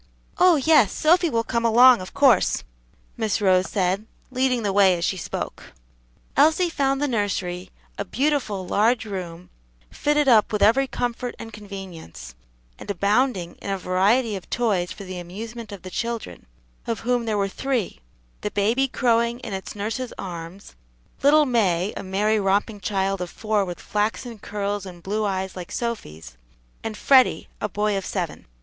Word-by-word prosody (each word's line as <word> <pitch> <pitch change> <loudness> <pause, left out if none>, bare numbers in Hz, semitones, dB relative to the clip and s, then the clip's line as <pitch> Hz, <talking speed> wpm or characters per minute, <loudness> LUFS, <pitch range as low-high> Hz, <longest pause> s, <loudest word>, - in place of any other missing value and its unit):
"Oh, 360 -2 +6
yes, 285 -7 +4
Sophy 340 +2 +3
will 230 -4 0
come 235 0 -1
along, 240 0 +7
of 185 - -8
course," 260 -9 +4 0.5
Miss 220 -2 0
Rose 185 -2 +3
said, 195 +2 0 0.2
leading 255 -2 +1
the 200 -2 0
way 190 -3 +5
as 170 - -1
she - - 0
spoke. 180 - -6 0.6
Elsie 320 +5 +4
found 275 -3 +1
the 290 - +1
nursery, 190 -6 -2 0.3
a - - 0
beautiful, 255 -6 -1
large 225 +5 +2
room, 180 -4 -7 0.4
fitted 295 -1 +1
up 225 -5 +5
with 210 -2 +1
every 265 +6 +4
comfort 245 0 -3
and 225 -1 -9
convenience, 195 - -9 0.5
and - - -10
abounding 200 -1 +1
in - - -6
a 195 - 0
variety 205 +6 +2
of 190 - -8
toys 200 -7 0
for 200 - -8
the 185 -1 -6
amusement 220 +6 -8
of 195 -3 -9
the 185 - -8
children, 230 - -4 0.4
of 230 -2 -2
whom 245 0 0
there 215 -2 0
were 200 -1 +1
three 240 - -2 0.4
the 210 - -2
baby 220 +7 +1
crowing 235 -2 +1
in 210 - -6
its 190 +2 -6
nurse's 225 +5 -3
arms, 175 +1 -8 0.5
little 300 +2 +5
May, 200 -7 +1
a - - -4
merry, 210 +3 +1
romping 205 +2 0
child 195 -1 -1
of 180 - -4
four, 215 0 0
with 175 -1 -6
flaxen 220 +2 -2
curls 205 -1 -3
and 175 -2 -11
blue 210 +2 -1
eyes 190 -1 -2
like 180 -1 -8
Sophy's, 80 - -5 0.5
and 220 -1 -4
Freddie, 260 +1 +4
a 210 - -1
boy 210 +1 0
of 195 - -2
seven. 180 - -4
210 Hz, 165 wpm, -23 LUFS, 190-240 Hz, 0.6 s, along